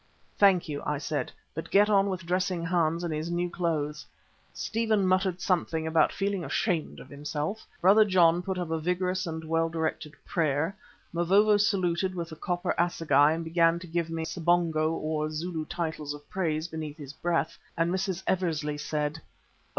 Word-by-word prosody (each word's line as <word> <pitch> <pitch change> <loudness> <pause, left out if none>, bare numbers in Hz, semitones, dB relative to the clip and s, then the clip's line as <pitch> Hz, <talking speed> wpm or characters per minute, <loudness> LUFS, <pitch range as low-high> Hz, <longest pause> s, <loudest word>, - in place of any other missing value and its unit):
"Thank 195 -4 +4
you," 145 -2 -4
I 150 - -1
said, 150 +1 -3 0.2
"but 160 - -6
get 205 +1 +5
on 200 -1 +3
with 185 -2 -4
dressing 180 -1 0
Hans 170 -1 +1
in 170 - -2
his 155 +2 -3
new 175 0 -1
clothes." 150 -4 -2 0.5
Stephen 220 -3 0
muttered 185 -1 +2
something 170 -3 0
about 160 0 +3
feeling 195 -2 -1
ashamed 170 -3 -1
of - - -11
himself. 150 +7 -4
Brother 200 +5 +7
John 175 -4 +4
put 190 +1 -3
up 175 -3 -3
a 160 - 0
vigorous 180 +2 -1
and 160 0 -4
well 165 +1 +1
directed 160 -2 -3
prayer. 160 +2 0 0.4
Mavovo 195 +5 +4
saluted 185 -3 +1
with 170 -2 -4
the 160 - -8
copper 175 +2 -1
assegai 160 -4 +3
and 165 +1 -3
began 165 0 +3
to 175 - -8
give 170 -1 -2
me 165 0 -3
sibonga 170 -2 +1
or 155 -1 -2
Zulu 160 +1 -3
titles 160 -4 -3
of 145 0 -14
praise 160 -4 -1
beneath 155 -2 -6
his 145 -3 -9
breath, 165 -1 -1 0.2
and 165 +1 +2
Mrs. 190 -1 -2
Eversley 155 -5 -1
said: 150 +1 -2
"Oh! - - -31
170 Hz, 175 wpm, -28 LUFS, 155-185 Hz, 0.5 s, Brother